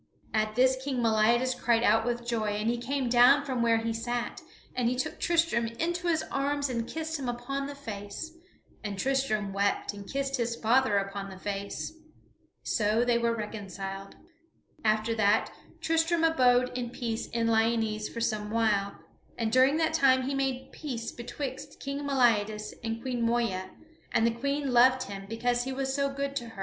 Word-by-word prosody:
At 215 Hz, 0 st, 0 dB
this 260 Hz, +2 st, +4 dB
King 270 Hz, -2 st, -2 dB
Meliadus 235 Hz, +2 st, +3 dB
cried 240 Hz, -2 st, +1 dB
out 225 Hz, +1 st, +4 dB
with 240 Hz, 0 st, -2 dB
joy, 220 Hz, -3 st, 0 dB
and 215 Hz, +2 st, 0 dB
he 240 Hz, -, -2 dB
came 265 Hz, +2 st, -1 dB
down 250 Hz, +4 st, +6 dB
from 260 Hz, -3 st, -1 dB
where 230 Hz, -1 st, +4 dB
he 225 Hz, 0 st, -1 dB
sat 240 Hz, +1 st, -3 dB, 0.3 s
and 245 Hz, -2 st, +1 dB
he 250 Hz, -, -1 dB
took 255 Hz, -, -3 dB
Tristram 330 Hz, -9 st, +2 dB
into 345 Hz, +9 st, -2 dB
his 320 Hz, -2 st, +2 dB
arms 280 Hz, 0 st, 0 dB
and 235 Hz, -1 st, -2 dB
kissed 320 Hz, -1 st, -3 dB
him 260 Hz, -3 st, -3 dB
upon 275 Hz, +3 st, -3 dB
the 285 Hz, -, -7 dB
face, 215 Hz, +3 st, -7 dB, 0.5 s
and 205 Hz, -2 st, -4 dB
Tristram 215 Hz, -5 st, 0 dB
wept 200 Hz, +1 st, 0 dB
and 200 Hz, -1 st, -9 dB
kissed 275 Hz, 0 st, -1 dB
his 235 Hz, -1 st, -1 dB
father 230 Hz, -1 st, +3 dB
upon 195 Hz, 0 st, -3 dB
the 190 Hz, -, -10 dB
face. 200 Hz, +7 st, -4 dB, 0.7 s
So 220 Hz, +2 st, +1 dB
they 240 Hz, -1 st, +3 dB
were 235 Hz, 0 st, +1 dB
reconciled. 195 Hz, -2 st, -6 dB, 0.7 s
After 215 Hz, +1 st, +2 dB
that, 215 Hz, -1 st, +2 dB, 0.3 s
Tristram 325 Hz, +1 st, +2 dB
abode 250 Hz, -6 st, +3 dB
in 245 Hz, -1 st, -2 dB
peace 230 Hz, -2 st, -3 dB
in 230 Hz, -1 st, -1 dB
Lyonesse 225 Hz, -1 st, +1 dB
for 230 Hz, -, -6 dB
some 215 Hz, -2 st, -1 dB
while, 210 Hz, -3 st, +1 dB, 0.4 s
and 225 Hz, -2 st, -1 dB
during 260 Hz, +4 st, +5 dB
that 320 Hz, 0 st, +1 dB
time 265 Hz, -4 st, +4 dB
he 270 Hz, +2 st, -2 dB
made 270 Hz, -1 st, -2 dB
peace 245 Hz, -7 st, -5 dB
betwixt 260 Hz, +2 st, -6 dB
King 275 Hz, 0 st, -4 dB
Meliadus 220 Hz, -5 st, +2 dB
and 225 Hz, 0 st, -2 dB
Queen 250 Hz, -2 st, -2 dB
Moeya, 230 Hz, -5 st, 0 dB, 0.4 s
and 225 Hz, -, +3 dB
the 230 Hz, -, +3 dB
Queen 280 Hz, +3 st, -2 dB
loved 255 Hz, +1 st, +5 dB
him 195 Hz, -1 st, -8 dB
because 245 Hz, +2 st, 0 dB
he 265 Hz, -, -3 dB
was 265 Hz, 0 st, -2 dB
so 280 Hz, 0 st, +1 dB
good 275 Hz, 0 st, -3 dB
to 240 Hz, -3 st, -4 dB
her. 225 Hz, -3 st, -12 dB
240 Hz, 180 wpm, -29 LUFS, 220-270 Hz, 0.7 s, down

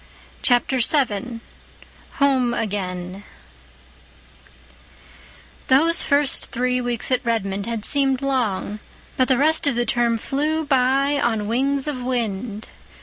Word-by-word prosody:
Chapter 250 Hz, +1 st, +2 dB
VII 235 Hz, -3 st, 0 dB, 0.7 s
Home 260 Hz, -4 st, +2 dB
Again 190 Hz, -3 st, -4 dB, 2.4 s
Those 320 Hz, +6 st, +4 dB
first 285 Hz, -1 st, +1 dB
three 250 Hz, 0 st, 0 dB
weeks 245 Hz, 0 st, -2 dB
at 255 Hz, -, +1 dB
Redmond 200 Hz, -4 st, -2 dB
had 230 Hz, -2 st, -3 dB
seemed 275 Hz, -2 st, +2 dB
long; 220 Hz, -6 st, -1 dB, 0.4 s
but 255 Hz, -, +2 dB
the 260 Hz, -, +3 dB
rest 310 Hz, +3 st, +3 dB
of 275 Hz, -, +1 dB
the 240 Hz, 0 st, 0 dB
term 240 Hz, -2 st, +1 dB
flew 305 Hz, +7 st, -1 dB
by 275 Hz, +1 st, +2 dB
on 220 Hz, -3 st, 0 dB
wings 275 Hz, +5 st, 0 dB
of 275 Hz, -4 st, -3 dB
wind. 230 Hz, -3 st, -3 dB
250 Hz, 115 wpm, -22 LUFS, 225-275 Hz, 2.4 s, Those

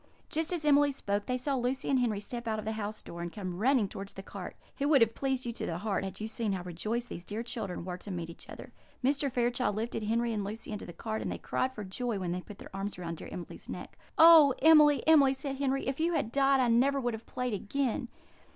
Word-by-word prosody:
Just 320 Hz, +2 st, -1 dB
as 340 Hz, -4 st, -2 dB
Emily 290 Hz, -1 st, +5 dB
spoke, 205 Hz, -6 st, -2 dB
they 250 Hz, -, 0 dB
saw 275 Hz, +3 st, -1 dB
Lucy 255 Hz, 0 st, -1 dB
and 270 Hz, -2 st, +3 dB
Henry 225 Hz, -5 st, +1 dB
step 235 Hz, +3 st, -6 dB
out 220 Hz, -1 st, 0 dB
of 215 Hz, -, -5 dB
the 220 Hz, -, -1 dB
house 215 Hz, -1 st, -4 dB
door, 170 Hz, -, -8 dB
and 170 Hz, 0 st, -4 dB
come 185 Hz, -3 st, -5 dB
running 245 Hz, -2 st, +3 dB
towards 195 Hz, +1 st, -7 dB
the 195 Hz, -, -7 dB
cart. -, -, -8 dB, 0.2 s
It 280 Hz, -, +1 dB
would 290 Hz, -4 st, +5 dB
have 225 Hz, 0 st, +4 dB
pleased 265 Hz, -2 st, -1 dB
you 235 Hz, -, -3 dB
to -, -, -4 dB
the 165 Hz, -, -2 dB
heart 200 Hz, +1 st, -1 dB
had 195 Hz, -, -6 dB
you 215 Hz, -, -3 dB
seen 220 Hz, -2 st, -2 dB
how 185 Hz, -2 st, -3 dB
rejoiced 215 Hz, +8 st, -3 dB
these 175 Hz, -, -7 dB
dear 215 Hz, +5 st, -4 dB
children 205 Hz, -7 st, -5 dB
were 180 Hz, -1 st, -4 dB
to 205 Hz, -, -10 dB
meet 175 Hz, -3 st, -4 dB
each -, -, -14 dB
other. -, -, -9 dB, 0.3 s
Mr. 280 Hz, +1 st, +1 dB
Fairchild 240 Hz, -3 st, +1 dB
lifted 225 Hz, +1 st, -2 dB
Henry 230 Hz, +2 st, 0 dB
and 210 Hz, -2 st, -1 dB
Lucy 215 Hz, +3 st, -6 dB
into 210 Hz, -, -5 dB
the -, -, -7 dB
cart; 220 Hz, +6 st, -4 dB
and -, -, -3 dB
they -, -, -3 dB
cried 260 Hz, -, -1 dB
for 215 Hz, -5 st, -7 dB
joy 220 Hz, +4 st, -3 dB
when 180 Hz, -2 st, -2 dB
they 180 Hz, +1 st, -2 dB
put 205 Hz, +1 st, -11 dB
their -, -, -11 dB
arms 195 Hz, 0 st, -4 dB
around 170 Hz, -2 st, -5 dB
dear -, -, -9 dB
Emily's 175 Hz, -, -8 dB
neck. -, -, -7 dB, 0.2 s
"Oh, 320 Hz, -5 st, +9 dB
Emily, 300 Hz, -2 st, +7 dB
Emily!" 285 Hz, -4 st, +6 dB
said 270 Hz, 0 st, -4 dB
Henry. 275 Hz, -1 st, 0 dB
"If 270 Hz, +2 st, -2 dB
you 335 Hz, +2 st, +1 dB
had 230 Hz, -8 st, 0 dB
died, 275 Hz, 0 st, +4 dB
I 255 Hz, -, +3 dB
never 265 Hz, +4 st, +3 dB
would 245 Hz, -2 st, -1 dB
have 220 Hz, +1 st, -8 dB
played 250 Hz, -2 st, -2 dB
again." 245 Hz, +4 st, -1 dB
235 Hz, 260 wpm, -31 LUFS, 200-270 Hz, 0.3 s, Oh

